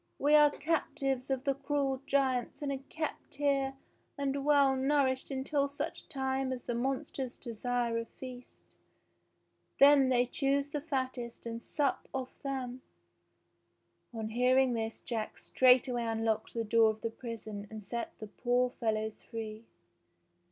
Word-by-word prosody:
"We 290 +2 +3
are 300 -1 +8
cap 315 0 -1
tives 270 -3 -1
of 265 -1 0
the 280 -1 +2
cruel 275 -1 -1
giants 265 -1 +1
and 280 - -1
are 270 - -2
kept 315 -1 -4
here 275 -2 +1 0.4
and 280 0 -1
well 280 -2 +5
nourished 265 -1 +1
until 280 +1 0
such 285 - -5
time 265 -2 -1
as 255 -2 -4
the 240 - -2
monsters 265 +1 -2
desire 235 0 -1
a 230 - -4
feast. 250 0 -12 1.0
Then 275 -1 +7
they 245 -1 +4
choose 280 +2 0
the 295 - -2
fattest 260 -6 -3
and 230 0 -5
sup 285 -2 -1
off 260 -1 -5
them." 260 -2 -4 1.3
On 220 -2 -4
hearing 250 +2 +3
this 225 -1 -3
Jack 225 -3 -3
straightway 250 -1 +4
unlocked 225 0 -1
the 230 - 0
door 225 +1 +5
of 220 0 -4
the 230 - -2
prison 220 -3 -7
and 220 -1 -8
set 235 +4 -5
the 215 - -7
poor 245 +3 +1
fellows 220 -2 -2
free. 220 0 -7
260 Hz, 145 wpm, -32 LUFS, 235-275 Hz, 1.3 s, are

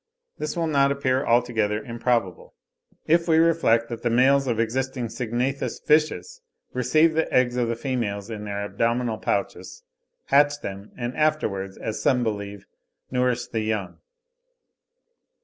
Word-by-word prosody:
This 150 +2 -3
will 170 - +1
not 140 -3 +3
appear 135 -1 0
altogether 115 -3 +1
improbable, 115 -5 -2 0.5
if 170 +2 +3
we 160 -1 +4
reflect 160 -9 +3
that 115 -1 -6
the 120 - 0
males 135 +3 +4
of 115 -3 0
existing 125 +1 -1
syngnathous 125 +4 -2
fishes 155 - +1 0.3
receive 155 +6 +3
the 160 +1 0
eggs 125 -1 +2
of 120 -1 0
the 115 - -1
females 115 -6 -3
in 105 -1 -6
their 100 0 -3
abdominal 115 +1 -1
pouches, 100 - -3 0.4
hatch 145 +1 +3
them, 100 +1 -7
and 120 0 -4
afterwards, 105 -12 -1
as 110 - -4
some 125 -2 +2
believe, 100 -3 -4 0.5
nourish 125 -1 0
the 110 - -3
young 110 -3 -2
(30. - - -23
120 Hz, 145 wpm, -24 LUFS, 110-140 Hz, 0.5 s, we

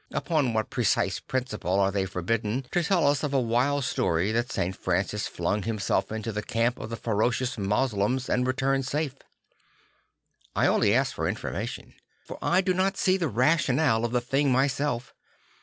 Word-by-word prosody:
upon 150 -7 +1
what 110 -1 -1
precise 100 -5 +1
principle 125 -8 -2
are 100 0 +3
they 95 -1 -1
forbidden 105 +7 -2
to 175 - +1
tell 175 -1 +2
us 145 0 +3
of 145 -2 -2
a - - +4
wild 130 +4 +1
story 85 -4 0
that 120 +2 -1
St. 90 +2 -1
Francis - - -1
flung 105 - -1
himself 110 0 -1
into 110 +1 -3
the 105 0 -3
camp 115 +3 0
of - - -6
the 115 - -4
ferocious 120 +4 0
Moslems 105 +3 0
and 125 0 +1
returned 135 +1 0
safe? 150 -1 -1 1.4
I - - +3
only - - +3
ask - - +1
for - - -2
information; - - -5 0.3
for - - -8
I 180 +2 +3
do 185 0 +1
not 190 +2 0
see 185 - +3
the 175 -4 0
rationale 130 -1 +2
of 120 - -1
the 125 0 +1
thing 135 +3 +1
myself. 130 -1 0
125 Hz, 175 wpm, -27 LUFS, 110-140 Hz, 1.4 s, a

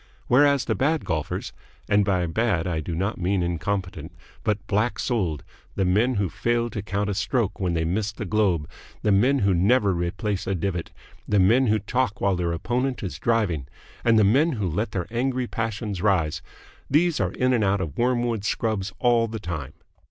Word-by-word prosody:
Whereas 140 +1 +4
the - - +1
bad 155 +4 0
golfers 80 -4 -3 0.3
and 100 0 +3
by 95 -3 +1
bad 90 -1 0
I 85 -3 -1
do 80 +2 -4
not 95 +5 -2
mean 95 +1 +1
incompetent, 90 -1 -3 0.3
but 105 -1 -1
black 105 +2 0
souled 90 - -1 0.3
the 95 - +1
men 110 +8 +2
who 100 -2 +1
fail 120 +4 -1
to 105 - -4
count 100 +1 -2
a - - -1
stroke 100 +2 -1
when 90 -3 0
they 80 0 0
miss 100 +5 -1
the 105 +1 -6
globe; 95 -7 +1 0.4
the 105 - +3
men 125 +8 +4
who 100 - +4
never 100 +3 +3
replace 90 +4 -2
a 95 - 0
divot; 90 -1 -2 0.4
the 105 - +2
men 115 +8 +4
who 110 0 +3
talk 110 +2 -1
while 100 -1 +2
their 85 -1 -1
opponent 125 +10 -1
is 85 -7 -5
driving; 100 - 0 0.4
and 115 -1 +4
the 110 - +5
men 140 +11 +3
who 105 -6 -2
let 100 +7 -1
their 90 -3 -2
angry 130 +1 0
passions 110 -4 -3
rise 85 -7 +1 0.5
these 160 +3 +2
are 90 -1 0
in 125 0 +1
and 115 -3 +2
out 100 0 +2
of 80 -7 -4
Wormwood 120 -3 0
Scrubbs 105 -3 -1
all 120 -1 +3
the 110 0 -5
time. 85 -8 -5
100 Hz, 190 wpm, -24 LUFS, 90-120 Hz, 0.5 s, the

